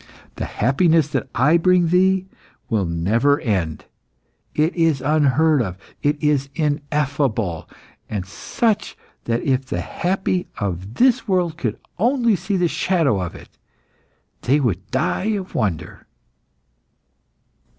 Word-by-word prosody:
The - - -2
happiness 155 - +2
that - - -2
I 145 +7 +4
bring 180 0 +3
thee 185 +1 +3 0.5
will 105 -4 +1
never 110 - +2
end; 95 - -2 0.7
it 155 +3 +1
is 165 -5 +2
unheard 150 +1 +3
of, 95 -5 -3 0.2
it 145 +1 +1
is 145 -2 +1
ineffable, 145 - -1 0.4
and 100 -4 -3
such 210 - -1 0.3
that 115 0 -1
if 130 -1 0
the 90 -7 -2
happy 185 - -1
of 95 0 -4
this 255 -1 +3
world 180 -4 +1
could 115 -9 -3 0.2
only 235 0 +3
see 190 +3 -2
a 180 -2 +2
shadow 160 - +1
of 90 - -5
it - - -15 0.8
they 140 +4 +2
would 100 - -1
die 140 - 0
of 195 -3 -4
wonder." 95 -8 -3
145 Hz, 125 wpm, -21 LUFS, 110-175 Hz, 0.8 s, I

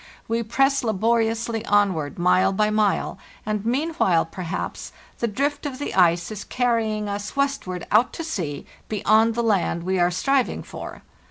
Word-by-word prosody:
We 230 +1 0
press 270 +5 +1
laboriously 225 +1 0
onward 190 -9 +1
mile 180 +2 +3
by 210 +2 +1
mile; 210 -2 0 0.3
and 210 -1 -2
meanwhile, 245 - +1
perhaps, 170 0 -5 0.3
the 235 - +1
drift 285 +7 -1
of 265 -3 -6
the 290 - -4
ice 175 +1 +3
is 210 -1 -6
carrying 225 -4 0
us 205 0 -4
westward 275 -11 -1
out 220 +4 +4
to 330 - -5
sea, 170 - -4 0.2
beyond 220 +2 +3
the 235 - 0
land 195 -6 +1
we 185 +1 0
are 175 0 +4
striving 265 +9 0
for. - - -9
215 Hz, 155 wpm, -23 LUFS, 185-235 Hz, 0.3 s, out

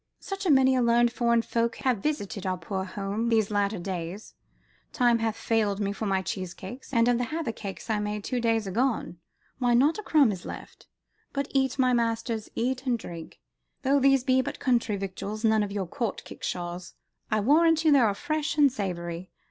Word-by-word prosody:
"Such 390 -1 -5
a - - +2
many 265 -2 +5
learned 235 0 +3
foreign 235 -1 +2
folk 230 0 0
have 255 -5 0
visited 205 -7 -3
our 185 0 -1
poor 190 +3 -4
house 205 +4 -3
these 220 -3 +2
latter 205 0 +1
days, 180 +2 -5 0.6
time 240 -2 +3
hath 225 -1 -1
failed 215 -4 0
me 200 -1 -1
for 215 +1 -4
my 190 -1 +1
cheese 185 -2 -4
cakes, 245 +8 -9
and 230 -2 +3
of 245 -1 +3
the 245 - 0
havercakes 230 -9 -5
I 220 -2 0
made 210 0 -3
two 250 +2 -2
days 225 -2 +1
agone, 225 -2 -1 0.4
why, 245 -2 +3
not 295 - +3
a - - -3
crumb 300 - +4
is 185 -3 -6
left. - - -10 0.5
But 280 0 -2
eat, 265 -2 +1
my 255 -2 +3
masters, 230 -1 -1
eat 260 +3 -1
and 245 -2 +2
drink. 170 -6 -9 0.4
Though 280 +1 +3
these 270 -1 +4
be 260 0 +3
but - - -5
country 240 -5 +1
victuals, 200 +3 -5
none 220 -1 +4
of 205 -1 -2
your 200 -2 -2
Court 215 +5 -3
kickshaws, 175 0 -5 0.3
I 215 - +2
warrant 320 +7 +4
you 310 - +6
they 285 - +6
are 215 -5 +3
fresh 310 +2 -2
and 285 -2 +6
savoury. 175 -5 -4
230 Hz, 195 wpm, -27 LUFS, 200-260 Hz, 0.6 s, you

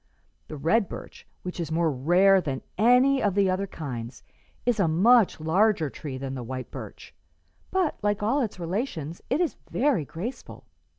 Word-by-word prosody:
The 155 - -7
red 185 +9 +2
birch, - - -10 0.2
which 180 0 -6
is 165 -2 -3
more 165 0 +2
rare 180 +8 +4
than 135 -5 -4
any 250 +5 +4
of 200 -2 +1
the 195 -2 +3
other 195 +2 -1
kinds, 125 -8 -7 0.4
is 240 -3 +1
a 190 - +3
much 205 +7 +4
larger 165 -1 +2
tree 140 -4 -6
than 135 0 -5
the 130 - -5
white 130 +1 -6
birch, - - -9 0.6
but, 370 -5 0
like 205 0 0
all 260 +7 +2
its 215 -6 -3
relations, 170 - -4
it 270 +6 +1
is 350 -4 0
very 260 - +1
graceful. 170 - -7
185 Hz, 170 wpm, -26 LUFS, 155-225 Hz, 0.6 s, rare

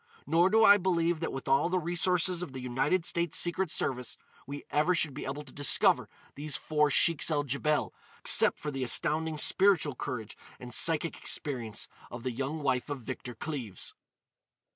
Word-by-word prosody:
Nor 165 +5 +3
do 220 +2 +4
I 205 - +8
believe 175 -3 0
that 165 - -3
with 135 - -7
all 135 +5 +2
the 185 - 0
resources 175 +1 +2
of 175 -7 -6
the 130 - -6
United 130 +8 -1
States 170 -2 0
Secret 175 +1 0
Service 125 -5 -2 0.3
we 145 +1 -7
ever 155 +5 +2
should 155 -3 0
be 145 - -7
able 140 +2 -5
to 135 - -16
discover 145 -1 +3 0.2
these 145 +1 -4
four 150 -1 +1
Sheiks 165 +3 +3
el 150 -2 +1
Djebel 145 +2 -1 0.3
except - - +3
for 150 - -5
the 135 -2 -3
astounding 155 +6 +2
spiritual 170 -2 +3
courage 125 -4 -6 0.2
and 125 -1 -7
psychic 165 +3 +2
experience 120 -7 -3 0.2
of 120 -1 -9
the 130 - -2
young 140 +5 -4
wife 130 0 -1
of 140 -3 -5
Victor 125 0 -7
Cleves." 120 - -6
150 Hz, 175 wpm, -29 LUFS, 130-170 Hz, 0.3 s, I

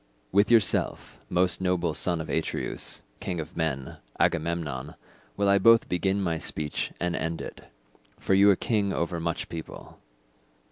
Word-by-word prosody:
"With 100 +2 +4
yourself, 115 -4 +2
most 90 +1 +1
noble 90 -3 +1
son 85 -1 +2
of 80 - -7
Atreus, - - -3 0.2
king 90 -2 -3
of 80 +2 -6
men, 70 -5 -2 0.2
Agamemnon, 80 -5 -1 0.4
will 100 0 +2
I 100 0 +5
both 115 +3 +6
begin 95 +2 0
my 85 -4 -1
speech 75 -1 -3
and 90 0 -1
end 80 0 -2
it, - - -8 0.5
for - - 0
you 100 +1 +6
are 100 - +6
king 100 -1 0
over 85 0 -2
much 85 0 -2
people. 80 -1 -9
85 Hz, 150 wpm, -27 LUFS, 80-95 Hz, 0.5 s, both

